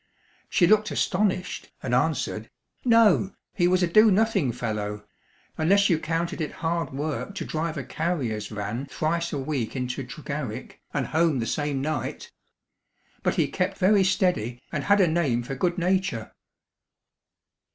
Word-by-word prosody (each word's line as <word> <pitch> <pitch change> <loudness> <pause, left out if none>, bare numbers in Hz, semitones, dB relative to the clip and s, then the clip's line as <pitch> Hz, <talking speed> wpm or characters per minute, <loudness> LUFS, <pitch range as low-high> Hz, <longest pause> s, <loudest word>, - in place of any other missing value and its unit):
She 175 - +4
looked 215 +3 +4
astonished, 185 -1 -1
and - - -2
answered, - - 0 0.3
"No: 225 -5 +4 0.2
he 175 -2 +2
was 185 0 +3
a - - +3
do 215 +6 +6
nothing 195 - +2
fellow 105 -3 -4 0.5
unless 200 +5 +4
you 160 - +3
counted 165 +3 -2
it 155 - -3
hard 165 -2 0
work 150 +7 -3
to - - -4
drive 160 0 -2
a 140 - -3
carrier's 130 -8 -2
van 105 +5 -4
thrice 170 +4 -1
a 145 - -2
week 135 -4 -2
into 130 +1 -3
Tregarrick, 135 -3 -6
and 140 -3 -1
home 160 0 +2
the 115 - -1
same 145 0 -1
night. 155 +1 -3 0.9
But - - 0
he - - +2
kept - - -2
very 195 +1 +4
steady, 180 - +1
and 150 -3 -3
had 205 0 +5
a 180 - +5
name 150 -8 +1
for 135 +3 -5
good 175 +6 0
nature." 180 - 0
155 Hz, 150 wpm, -26 LUFS, 130-185 Hz, 0.9 s, do